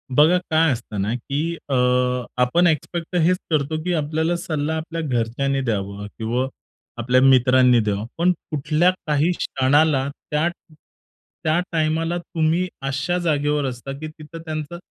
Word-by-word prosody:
बघा 160 +6 +6
काय 160 -1 +3
असतं 115 -4 -4
ना, 105 +4 -1
की 145 +7 -3
अ, 135 - +1 0.7
आपण 170 +9 +4
एक्सपेक्ट 165 +1 -1
तर - - +2
हेच 180 +3 +3
करतो, 155 0 0
की 180 0 -1
आपल्याला 160 +2 0
सल्ला 160 -3 -2
आपल्या 165 +1 -4
घरच्यांनी 135 0 -1
द्यावा 100 -4 -3
किंवा 120 +3 -1 0.5
आपल्या 125 +2 +3
मित्रांनी 130 -1 +5
द्यावा. 105 -1 -1
पण 175 +2 +3 0.2
कुठल्या, 155 +4 +2 0.2
काही 150 +4 +2
क्षणाला 140 +1 +2 0.2
त्या, 150 +3 +2 0.3
त्या 155 +1 -5
टाईमाला 165 +1 0
तुम्ही 170 +1 0
अशा 140 +6 -1
जागेवर 150 -2 +1
असता, 130 +1 -5
की 155 - -5
तिथं 155 +1 -11
त्यांचं 155 +1 -5
150 Hz, 140 wpm, -22 LUFS, 130-165 Hz, 0.7 s, बघा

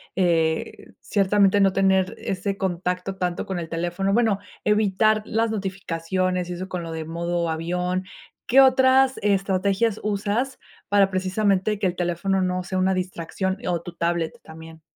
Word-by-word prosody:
eh, 165 -3 0
ciertamente 200 0 +3
no 195 -1 +4
tener 190 -1 +2
ese 195 +1 -3
contacto 180 +1 -2
tanto 180 -1 -2
con 190 -2 -3
el 165 - -5
teléfono, 175 +4 -1
bueno, 220 -4 +2 0.2
evitar 215 +1 +2
las 225 +1 0
notificaciones 185 -2 -2
y - - -3
eso 185 +2 -6
con 180 -2 -4
lo 165 - -6
de 160 -1 -4
modo 170 +1 -2
avión. 180 +3 -2 0.4
¿Qué 270 +3 +6
otras 260 0 +4
estrategias 200 +2 +1
usas 210 +6 -1 0.3
para 200 -1 +3
precisamente 195 +2 +1
que 195 - +1
el 180 - -3
teléfono 180 +2 0
no 180 0 -1
sea 185 +1 -4
una 190 +1 +2
distracción, 185 +1 -3
o 170 -2 0
tu 175 - -8
tablet 170 -1 -2
también? 160 0 -12
185 Hz, 150 wpm, -23 LUFS, 175-200 Hz, 0.4 s, Qué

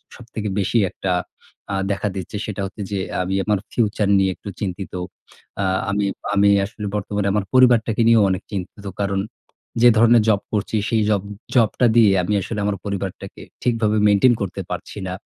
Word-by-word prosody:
সবথেকে 110 -3 -6
বেশি 100 +4 +1
একটা 95 - -4 0.6
আ - - 0 0.2
দেখা 100 +1 -1
দিচ্ছে 95 +1 -6
সেটা 105 -2 -4
হচ্ছে 100 +2 -8
যে 100 - -1 0.2
আমি 95 +1 -3
আমার 105 -2 +1
ফিউচার 105 -3 0
নিয়ে 95 -1 +2
একটু - - -9
চিন্তিত। 95 -1 -4 0.7
আ - - +1 0.3
আমি, 100 0 0 0.3
আমি 100 0 +4 0.2
আসলে 105 +1 -8
বর্তমানে 105 0 -2
আমার 105 -1 0
পরিবারটাকে 120 -3 +4
নিয়েও 115 -2 +6
অনেক 95 -1 -2
চিন্তিত। 100 +1 -6 0.2
কারণ 100 -1 0 0.6
যে 120 - +8
ধরণের 115 0 +5
জব 100 -2 +3
করছি 105 +1 -1
সেই 115 -2 +2
জব, 105 -2 +2 0.3
জব 115 -4 +5
টা 125 - +5
দিয়ে 110 -4 +6
আমি 105 - -1
আসলে 105 +3 -4
আমার 100 -1 -1
পরিবারটাকে 100 -2 -5 0.2
ঠিকভাবে 115 -3 +1
মেইনটেইন 105 +5 +5
করতে 100 -3 -3
পারছি - - -6
না। 90 - -4
105 Hz, 175 wpm, -21 LUFS, 100-110 Hz, 0.7 s, যে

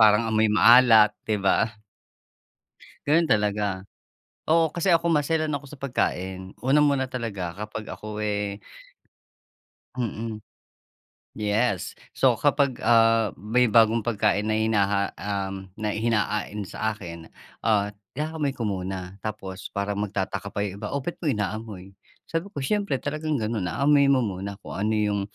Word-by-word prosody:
parang 110 +1 +5
amoy 110 0 +3
maalat 110 -1 +7 0.2
'di 110 - +2
ba? 100 - +3 1.4
Gano'n 160 +2 +3
talaga, 105 -2 0 0.7
oo 160 -1 +3
kasi 175 +2 0
ako 170 0 +3
maselan 155 0 +1
ako 145 0 -4
sa 150 - -11
pagkain. 95 -8 -3
Unang-una 140 -1 +3
talaga 110 -9 -4
kapag 105 +2 -6
ako, 105 0 -8
eh 105 -1 -2 1.4
Mm. 115 -2 -4 1.0
Yes. 105 -1 0 0.2
So - - +3
kapag, 140 -3 +1
ah, 115 -1 +4
may 115 +4 +2
bagong 115 0 +4
pagkain 105 -1 +1
na 110 - +1
hinaha 100 -3 +2
um, 95 0 -4
na 105 -1 -2
hinain 105 -2 -1
sa 110 +3 -2
akin, 85 -6 -8 0.3
ah, 105 -2 +1 0.2
inaamoy 155 -1 -1
ko 125 -4 -4
muna 95 -1 -4
tapos 100 -3 -6
parang 100 0 -2
magtataka 100 0 -3
pa - - -7
yung 100 0 -8
iba, - - -3
"oh 140 - -1
ba't 155 +6 -4
mo 155 - +1
inaamoy?" 105 -3 -4 0.3
Sabi 165 +4 -3
ko, 150 - -8
"siyempre 140 +1 0
talagang 155 +1 -2
gano'n, 110 -5 -2
aamuyin 140 - +4
mo 135 -2 +4
muna 100 +1 -5
kung - - -9
ano 105 +3 0
yung 105 -1 +1
110 Hz, 140 wpm, -25 LUFS, 100-130 Hz, 1.4 s, maalat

